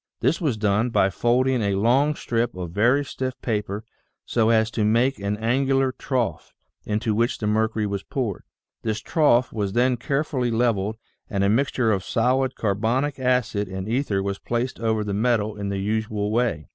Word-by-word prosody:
This 130 - +1
was 140 -9 0
done 105 +3 +1
by 100 -4 +2
folding 125 +5 +2
a 100 -2 +1
long 130 +9 +3
strip 115 -5 -1
of 90 -2 -5
very 120 +9 +3
stiff 130 -1 -4
paper 105 -2 -2 0.4
so 115 -2 +2
as 110 -1 +3
to 110 - -1
make 120 +5 +2
an 100 +1 -2
angular 135 +4 +1
trough 125 -4 -3 0.3
into 110 +1 0
which 115 +3 +1
the 110 - -4
mercury 110 0 +1
was 100 -1 -2
poured. 120 -6 -3 0.4
This 110 -1 -2
trough 130 -5 +2
was 100 -3 -2
then 125 +1 +2
carefully 135 0 -1
leveled 110 -3 0 0.3
and 100 -4 0
a 100 - +3
mixture 125 0 +2
of 95 -3 0
solid 130 +3 +1
carbonic 115 +8 0
acid 125 -5 +1
and 95 +1 -5
ether 110 -5 0
was 100 0 -3
placed 120 +2 -2
over 110 -1 0
the 105 -1 -3
metal 110 -1 +1
in 100 -1 -4
the 100 - -2
usual 105 +1 -1
way. 110 -10 0
115 Hz, 175 wpm, -24 LUFS, 105-125 Hz, 0.4 s, long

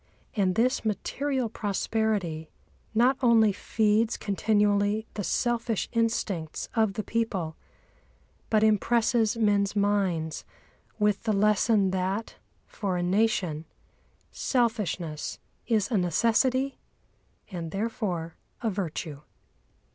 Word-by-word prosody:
And 190 -4 +2
this 250 +4 +2
material 260 +4 -1
prosperity 205 -6 -1 0.5
not 250 +4 +4
only 230 -4 +5
feeds 215 +2 +1
continually 205 +1 +1
the 205 - -3
selfish 235 +2 0
instincts 225 -8 -1
of 220 -4 +2
the 215 - -3
people, 195 -9 -2 0.9
but 215 -1 +3
impresses 225 +1 +2
men's 205 -2 +2
minds 190 -6 0 0.5
with 210 -2 +2
the 220 - +2
lesson 210 -1 +3
that, 190 +4 -2 0.3
for 195 -4 -3
a 175 - -1
nation, 180 -5 +1 0.7
selfishness 205 - -1 0.3
is 220 -1 +1
a 215 - +3
necessity 240 - +1 0.7
and 170 -3 -5
therefore 195 -4 -3 0.3
a 225 - +1
virtue. 165 -6 -4
210 Hz, 100 wpm, -27 LUFS, 185-225 Hz, 0.9 s, only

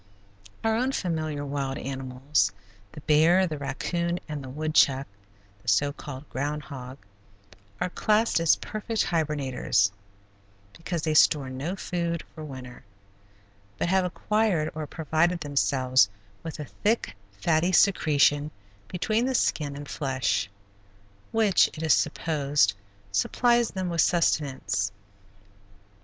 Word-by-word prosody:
Our 225 0 +2
own 255 +4 0
familiar 155 - -2
wild 140 -1 -3
animals, 135 +1 -1 0.4
the 150 - -10
bear, 160 +6 +4
the 155 -4 -4
raccoon, 170 +5 -2
and 150 -2 -5
the 130 - -8
woodchuck 140 -2 +2 0.6
the - - -24
so 145 0 +2
called 145 -1 -9
ground 145 +3 -3
hog 130 -2 -8 0.8
are 180 - -1
classed 215 0 +2
as 165 -2 +4
perfect 215 +1 -2
hibernators, 135 - +1 0.8
because 165 -1 -4
they 155 - +1
store 145 -3 +4
no 140 +8 -4
food 170 -3 -3
for 155 - -9
winter, 130 -4 -9 0.9
but 170 - -1
have 190 0 +3
acquired 180 -3 0
or 155 -1 -5
provided 165 +3 0
themselves 130 -6 +2 0.3
with 165 -1 -7
a 150 - -4
thick, 205 - -1 0.2
fatty 160 - +2
secretion 150 -6 +3 0.4
between 215 +6 0
the 265 - 0
skin 145 -10 0
and 145 0 -8
flesh, 130 -8 -1 0.8
which, 220 -4 +4
it 160 - -5
is 160 - +5
supposed, 145 -9 +1 0.4
supplies 235 - +2
them 185 -1 -3
with 170 -2 +1
sustenance. 130 - +1
155 Hz, 120 wpm, -26 LUFS, 135-175 Hz, 0.9 s, is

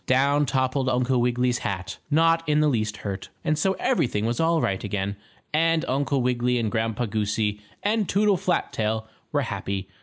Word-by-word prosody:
Down 140 +3 +3
toppled 130 +1 +1
Uncle 125 0 +2
Wiggily's 125 0 +1
hat, 95 -4 -4
not 165 +2 +4
in 150 0 +3
the 155 - +4
least 110 -6 0
hurt, 95 -1 -4 0.2
and 155 - +2
so 190 +5 +1
everything 120 - 0
was 120 +1 -1
all 165 0 +3
right 95 -9 -1
again, 100 0 -2 0.4
and 165 +1 +2
Uncle 135 0 0
Wiggily 125 0 +1
and 110 -3 -1
Grandpa 115 +1 -1
Goosey 105 -1 -1 0.2
and 210 -1 +1
Toodle 205 0 +3
Flat 175 0 -1
tail 110 0 -1 0.2
were - - +1
happy. 95 -1 -3
125 Hz, 175 wpm, -25 LUFS, 110-150 Hz, 0.4 s, not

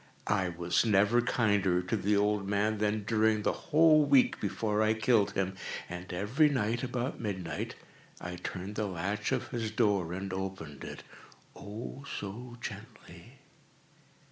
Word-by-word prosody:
I 90 -2 +1
was 85 0 +1
never 105 +2 +4
kinder 100 -7 +2
to 90 - -1
the 105 0 +1
old 105 -1 +1
man 105 +1 +1
than 105 0 0
during 110 0 +2
the - - +2 0.2
whole 155 -1 +6
week 140 -3 +4
before 105 +1 0
I 110 0 +3
killed 110 -4 +3
him. 95 -1 -1 0.3
And 90 +1 -7
every 110 - +2
night, 120 -3 0
about 125 0 -3
midnight, 95 -5 -4 0.4
I 90 0 -6
turned 95 +4 -6
the 105 -1 0
latch 100 +3 -2
of - - -1
his 115 -3 -2
door 105 -6 +1
and 95 +1 -4
opened 95 -7 -5
it—oh, 110 +6 -10 0.2
so 120 +5 -7
gently! - - -9
105 Hz, 145 wpm, -31 LUFS, 95-115 Hz, 0.4 s, whole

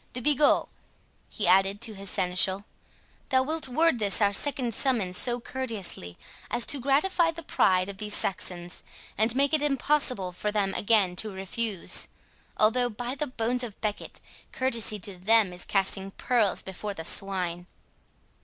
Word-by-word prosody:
—De 250 - -4
Bigot," 295 +3 +3 0.6
he 205 - -3
added 195 +2 +4
to 220 - -2
his 195 -1 -8
seneschal, 185 +2 +1 0.6
"thou 260 -1 +3
wilt 310 +1 -3
word 310 0 +2
this 200 -2 +2
our 205 -2 +3
second 255 0 -1
summons 215 -8 +1
so 240 +4 +1
courteously, 215 - -5 0.3
as 240 - +2
to 285 - -1
gratify 315 +7 +2
the 330 0 -7
pride 185 -9 +2
of 200 -1 -8
these 210 -1 0
Saxons, 180 -2 -3 0.3
and 220 +3 +1
make 280 +2 +2
it 310 - +2
impossible 275 -8 +1
for 210 +4 -3
them 200 -2 0
again 200 -4 +2
to 215 - +1
refuse; 195 +1 -1 0.5
although, 245 +3 +3
by 245 +3 -5
the 290 +2 -2
bones 250 0 -2
of 225 -5 -8
Becket, 210 -2 -4 0.3
courtesy 235 -5 0
to 185 -1 -5
them 210 -1 +4
is 180 - -5
casting 195 0 +1
pearls 215 -1 +1
before 200 +2 -6
swine." 180 -1 +1
215 Hz, 155 wpm, -27 LUFS, 195-255 Hz, 0.6 s, added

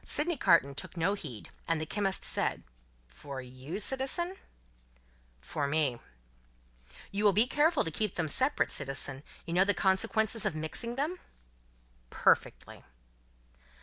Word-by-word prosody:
hi! - - -33
hi!" - - -2
Sydney 315 +2 +3
Carton 165 - +4
took 155 +6 -7
no 170 +4 +2
heed, 140 - -7 0.2
and 165 -1 +1
the 155 - -3
chemist 195 +2 -1
said: - - +1 0.4
"For 130 - -8
you, 130 +7 -7
citizen?" 270 - -1 1.1
"For 140 - -2
me." 140 -5 +1 1.1
"You 200 +2 -2
will 205 -2 +5
be 215 +5 +5
careful 295 +4 +2
to 165 - -3
keep 210 +4 -1
them 165 -2 -1
separate, 260 - +2
citizen? 135 -1 -1 0.2
You 170 - -4
know 180 +2 +5
the 205 +1 +2
consequences 220 +3 +1
of - - 0
mixing 160 +10 -4
them?" 310 +7 -2 0.9
"Perfectly." - - +1
190 Hz, 145 wpm, -31 LUFS, 145-235 Hz, 1.1 s, will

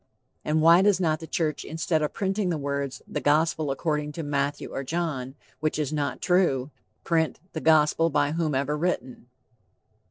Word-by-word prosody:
And 155 +1 +1
why 170 +2 +7
does 200 -1 +3
not 155 -4 +1
the 160 - -9
church 155 -2 -1
instead 160 0 -1
of 150 - -1
printing 195 -1 -1
the 165 - 0
words, 140 -1 -3
"The - - -4
Gospel 155 0 +2
according 150 +1 -2
to 165 - -5
Matthew 145 0 -2
or 135 - -3
John," 140 -4 -3 0.2
which 155 0 -1
is 150 -1 -2
not 145 -2 -2
true, 160 -7 +2 0.3
print, 160 -2 0
"The 160 - -4
Gospel 160 +1 +4
by 145 -1 +1
whomever 150 -3 0
written"? 150 -7 -3
155 Hz, 165 wpm, -26 LUFS, 145-165 Hz, 0.3 s, why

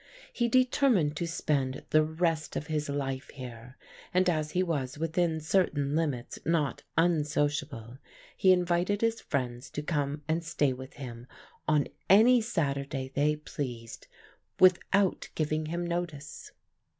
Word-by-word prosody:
He 240 - +1
determined 250 - +3
to 170 - -2
spend 140 -5 -1
the 155 - +6
rest 160 0 -1
of - - -2
his 150 -1 -2
life 135 -2 -3
here, 125 -1 -9 0.3
and 185 0 +3
as 155 -3 +1
he 185 - +2
was 145 -7 -2
within 165 +1 0
certain 155 -4 +1
limits 145 -7 -2
not 155 -4 0 0.2
unsociable, 145 -6 0 0.4
he 190 - +5
invited 180 +2 +2
his 230 0 +1
friends 125 -2 -3
to 150 - -5
come 145 -1 -2
and 160 +1 0
stay 150 -4 +1
with 130 +1 -9
him 120 -3 -8 0.4
on 150 -2 +3 0.2
any 230 +6 +7
Saturday 140 - -2
they 150 +2 +2
pleased, 125 -6 -6 0.5
without 185 +1 +3
giving 155 0 -1
him 170 +2 -2
notice. 170 -4 -5
155 Hz, 135 wpm, -29 LUFS, 140-175 Hz, 0.5 s, any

